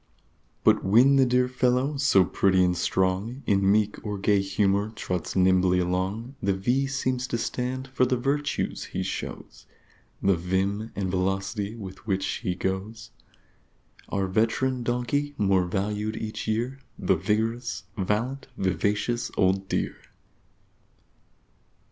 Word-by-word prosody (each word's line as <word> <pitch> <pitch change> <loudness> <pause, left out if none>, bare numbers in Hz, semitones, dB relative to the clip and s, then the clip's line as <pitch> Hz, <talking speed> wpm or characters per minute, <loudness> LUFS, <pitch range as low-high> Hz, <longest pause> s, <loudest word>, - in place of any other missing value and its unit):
But - - +4
when 125 +8 +5
the 135 -1 +5
dear 125 0 +3
fellow, 125 +3 +1
so 135 -10 +4
pretty 95 0 +3
and 90 -1 +2
strong, 95 +9 0
In 100 -1 +3
meek 105 0 +1
or 105 -2 -3
gay 100 0 +2
humor 100 +1 +1
trots 90 -4 -3
nimbly 95 -1 +4
along, 95 +7 -1
The 100 0 +1
V 125 +8 +1
seems 130 -1 -1
to 120 - -1
stand 130 +3 -3
for 130 -1 +1
the 125 0 +1
Virtues 145 +4 -1
he - - -3
shows, - - -6 0.5
The 95 -1 +3
Vim 95 +5 -1
and 95 -2 -2
Velocity 95 +3 -1
with 95 -2 -10
which 95 -2 0
he 90 - -2
goes 95 +4 -4 1.0
Our 100 -1 0
Veteran 115 +6 +1
donkey, 125 +5 -1
more 95 -3 +3
Valued 105 +3 -2
each 110 0 -5
year, 120 +5 -1 0.2
The - - +2
Vigorous, 115 +3 -1
Valiant, 115 +7 -1
Vivacious 100 +6 0
old 95 0 +2
dear! - - -1
105 Hz, 130 wpm, -26 LUFS, 95-125 Hz, 1.0 s, when